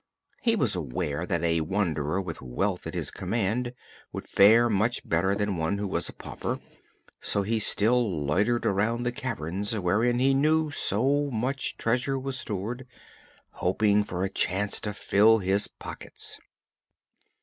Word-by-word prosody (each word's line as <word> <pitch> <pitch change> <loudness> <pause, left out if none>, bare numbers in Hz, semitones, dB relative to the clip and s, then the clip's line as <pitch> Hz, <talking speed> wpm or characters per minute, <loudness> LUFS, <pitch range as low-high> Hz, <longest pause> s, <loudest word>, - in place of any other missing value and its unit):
He 230 -1 +3
was 125 - +1
aware 80 +1 -3
that 85 -1 -1
a 85 -1 +2
wanderer 80 -2 -1
with 85 -4 -5
wealth - - -2
at - - -6
his - - -2
command 115 +5 -1 0.4
would - - -7
fare 115 +4 +6
much 110 +2 0
better 95 +4 +2
than 100 -2 -1
one 80 +5 0
who 100 0 -2
was - - -1
a - - -9
pauper, - - -5 0.6
so 100 - 0
he 110 +3 0
still 105 -7 +2
loitered 105 +11 +1
around 110 +5 +1
the 120 - 0
caverns 105 - -3
wherein 105 +6 +1
he 135 +2 +3
knew 155 +2 +2
so 140 +4 +2
much 130 +3 -2
treasure 125 +4 0
was 135 0 -4
stored, 115 +6 -4 0.6
hoping 105 +3 +2
for 90 -2 -4
a 95 - 0
chance 100 +1 0
to 105 - -4
fill 110 +3 +4
his 100 0 +1
pockets. - - -9
105 Hz, 150 wpm, -27 LUFS, 95-120 Hz, 0.6 s, fare